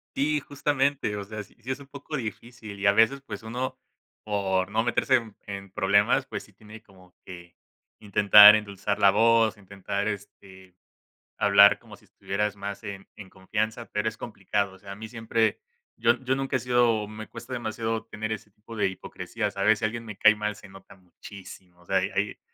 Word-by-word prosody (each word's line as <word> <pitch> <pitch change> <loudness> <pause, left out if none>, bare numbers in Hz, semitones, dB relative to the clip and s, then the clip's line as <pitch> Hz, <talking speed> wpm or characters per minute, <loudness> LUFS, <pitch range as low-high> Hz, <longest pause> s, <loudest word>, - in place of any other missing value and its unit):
Si, 150 +2 +1
justamente, 140 -4 -1
o 100 - -4
sea, 105 +1 -7
sí - - -23
sí 125 - -10
es 130 - -4
un 140 - -13
poco 140 +2 -8
difícil 110 -3 -8
y 100 - +1
a - - +7
veces 115 +6 +3
pues, 110 -5 -8
uno 125 +3 -4 0.5
por 95 -3 -1
no 110 +2 +1
meterse 120 +2 +2
en 115 -4 -2
en 100 -1 -8
problemas, 105 +7 +2
pues, - - -6
sí 105 - -20
tiene 110 +2 -14
como 95 -3 -21
que 85 -2 -11 0.4
intentar 105 0 +8
endulzar 100 -1 -3
la 100 - +6
voz, 115 0 +3
intentar, 100 +1 -4
este, 95 -2 -8 0.6
hablar 100 0 +6
como - - -14
si - - -24
estuvieras 105 +1 -3
más 100 +2 -7
en 100 -2 -8
en 95 -3 -11
confianza, 110 +5 -3
pero 105 +1 -1
es 110 - -13
complicado, 100 -2 -3
o 95 - -16
sea, 100 -1 -11
a - - -10
mí 110 +2 -8
siempre 115 -1 0 0.4
yo 120 +1 +3
yo 130 +1 +1
nunca 135 0 -2
he - - +2
sido 120 -4 +2
me 110 +1 -9
cuesta 120 +3 -11
demasiado 115 -1 -3
tener 110 0 -5
ese 105 -1 -5
tipo 105 +3 -13
de 105 - +2
hipocresías, 95 +3 -5
¿sabes?, 105 +2 +3
si 110 - -1
alguien 115 +1 -4
me 105 -2 -8
cae 105 +1 +6
mal 105 0 -3
se 100 - -14
nota 95 0 -15
muchísimo, 90 -1 -14
o - - -21
sea, - - +1
hay - - 0
hay - - -1
105 Hz, 195 wpm, -26 LUFS, 100-115 Hz, 0.6 s, intentar